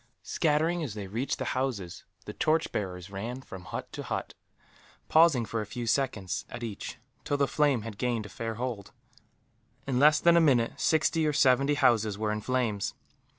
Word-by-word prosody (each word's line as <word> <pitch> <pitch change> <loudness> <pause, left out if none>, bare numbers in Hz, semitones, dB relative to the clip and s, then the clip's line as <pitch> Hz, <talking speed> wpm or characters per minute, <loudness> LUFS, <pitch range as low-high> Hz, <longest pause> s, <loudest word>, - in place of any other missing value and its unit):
Scattering 160 +3 +1
as 130 -10 -4
they 105 -2 -5
reached 115 +8 -2
the - - -3
houses, 105 -10 -3 0.2
the - - -6
torch 160 +1 +1
bearers 90 -2 -4
ran 115 +6 -5
from 95 -6 -10
hut - - -6
to - - -6
hut; - - -4 0.8
pausing 155 -7 +5
for 115 0 -3
a - - -4
few 120 +2 -5
seconds, 115 -7 -1
at 120 0 -7
each, 110 -4 -6 0.3
till 145 - -1
the 140 -1 +2
flame 145 -7 +2
had 105 -2 -8
gained 120 -4 -1
a - - -9
fair 115 +3 -4
hold. 120 -4 -5 0.9
In 130 -2 0
less 150 +2 +6
than 170 +1 +5
a 170 - +6
minute, 125 -7 +3
sixty 160 0 +2
or 150 - +1
seventy 140 0 +4
houses 110 -7 +3
were 105 0 -1
in 105 0 -2
flames. 115 -5 -1
125 Hz, 185 wpm, -29 LUFS, 105-145 Hz, 0.9 s, less